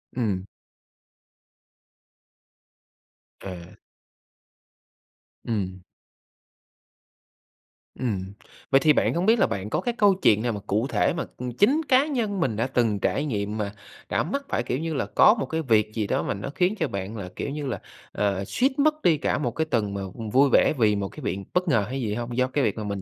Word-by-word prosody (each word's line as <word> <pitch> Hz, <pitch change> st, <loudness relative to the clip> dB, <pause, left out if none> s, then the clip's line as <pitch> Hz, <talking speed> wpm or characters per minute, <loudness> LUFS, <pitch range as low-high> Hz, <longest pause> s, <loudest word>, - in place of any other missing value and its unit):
Ừm. 100 Hz, -6 st, -1 dB, 2.9 s
Ờ. 95 Hz, -2 st, -7 dB, 1.9 s
Ừm. 95 Hz, -5 st, -3 dB, 2.2 s
Ừm. 100 Hz, -6 st, -3 dB, 0.4 s
Vậy 135 Hz, -, +6 dB
thì 150 Hz, +2 st, +5 dB
bạn -, -, +2 dB
không 175 Hz, +2 st, 0 dB
biết 225 Hz, +2 st, +4 dB
là 195 Hz, -, +4 dB
bạn 100 Hz, +1 st, -4 dB
có -, -, 0 dB
cái 240 Hz, -, -1 dB
câu 205 Hz, -2 st, +5 dB
chuyện 110 Hz, -, +3 dB
nào 120 Hz, -, 0 dB
mà 105 Hz, -, -4 dB
cụ 110 Hz, +6 st, +1 dB
thể 155 Hz, -, +1 dB
mà, 170 Hz, -, -3 dB
ừm, 125 Hz, 0 st, -4 dB
chính 255 Hz, -, +3 dB
cá 260 Hz, +2 st, +5 dB
nhân 225 Hz, -9 st, -1 dB
mình 130 Hz, -10 st, 0 dB
đã 115 Hz, +4 st, 0 dB
từng 115 Hz, -6 st, +1 dB
trải 145 Hz, -, 0 dB
nghiệm 105 Hz, -5 st, -2 dB
mà 105 Hz, -2 st, -2 dB, 0.4 s
đã -, -, +1 dB
mắc 280 Hz, -, -3 dB
phải, -, -, 0 dB
kiểu 125 Hz, -, -2 dB
như 165 Hz, 0 st, -3 dB
là, 135 Hz, -, -1 dB
có 210 Hz, -, +5 dB
một 220 Hz, -, -3 dB
cái 160 Hz, 0 st, -2 dB
việc 110 Hz, -6 st, +2 dB
gì 110 Hz, -3 st, -1 dB
đó -, -, 0 dB
mà -, -, -1 dB
nó 100 Hz, +6 st, -5 dB
khiến 185 Hz, +3 st, +2 dB
cho -, -, +1 dB
bạn 100 Hz, +3 st, -5 dB
là, 95 Hz, -3 st, -6 dB
kiểu -, -, -3 dB
như 145 Hz, 0 st, -4 dB
là, 130 Hz, -, -3 dB, 0.3 s
ờ, 100 Hz, -1 st, -1 dB
suýt 265 Hz, +2 st, 0 dB
mất 305 Hz, +1 st, +2 dB
đi 165 Hz, -, +4 dB
cả -, -, 0 dB
một 125 Hz, -5 st, -1 dB
cái 160 Hz, +7 st, -1 dB
tuần 110 Hz, -9 st, -1 dB
mà 100 Hz, -, -3 dB, 0.3 s
vui 135 Hz, +2 st, +5 dB
vẻ -, -, +4 dB
vì 105 Hz, -3 st, +3 dB
một 100 Hz, -1 st, -2 dB
cái -, -, -12 dB
việc 95 Hz, -, -1 dB, 0.2 s
bất 180 Hz, +1 st, +1 dB
ngờ 115 Hz, -10 st, +2 dB
hay 135 Hz, +1 st, -3 dB
gì 105 Hz, -3 st, -1 dB
hông, 120 Hz, +1 st, -4 dB
do 130 Hz, 0 st, +3 dB
cái 140 Hz, +1 st, 0 dB
việc 110 Hz, 0 st, 0 dB
mà 110 Hz, -, -3 dB
mình 100 Hz, -1 st, -4 dB
125 Hz, 200 wpm, -25 LUFS, 105-165 Hz, 2.9 s, Vậy